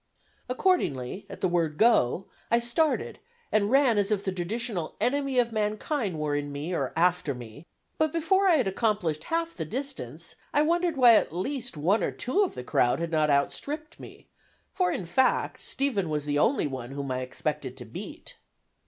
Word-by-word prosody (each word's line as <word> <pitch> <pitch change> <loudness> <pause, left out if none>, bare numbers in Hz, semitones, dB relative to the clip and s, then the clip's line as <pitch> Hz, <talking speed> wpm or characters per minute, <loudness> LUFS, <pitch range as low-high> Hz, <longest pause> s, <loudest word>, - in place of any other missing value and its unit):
Accordingly, 205 - 0
at - - -9
the 185 - +3
word 165 -4 0
"go," 195 - +3 0.2
I 235 - +4
started 240 +7 0 0.3
and 210 -1 +2
ran 260 -4 +4
as 200 0 +1
if 205 -2 0
the 190 - -1
traditional 185 0 -3
enemy 275 0 0
of 240 -1 +3
mankind 215 - -1
were 150 -1 -1
in 145 0 -3
me 145 +5 -4
or 135 -6 -1
after 175 -4 +2
me, 120 +6 -11 0.3
but 315 -1 +2
before 335 +4 +2
I 345 - +6
had 255 -9 +2
accomplished 195 -7 0
half 335 0 -1
the 165 - -4
distance, 165 - -5 0.2
I 295 - +5
wondered 340 0 +1
why 245 -3 +8
at - - 0
least, 245 - -3
one 185 +9 +2
or - - +1
two 260 - 0
of 380 - -3
the 125 - -5
crowd 120 0 +2
had 170 0 -3
not 155 -2 +2
outstripped 295 - -1
me, - - -12 0.5
for, 365 -1 +1
in 185 - -3
fact, 255 +10 +1
Stephen 240 - 0
was 150 -1 -2
the 145 0 0
only 265 - +3
one 130 -4 -5
whom 140 -1 -4
I 130 - -1
expected 125 0 -4
to - - -8
beat. - - -9
200 Hz, 185 wpm, -27 LUFS, -, 0.5 s, why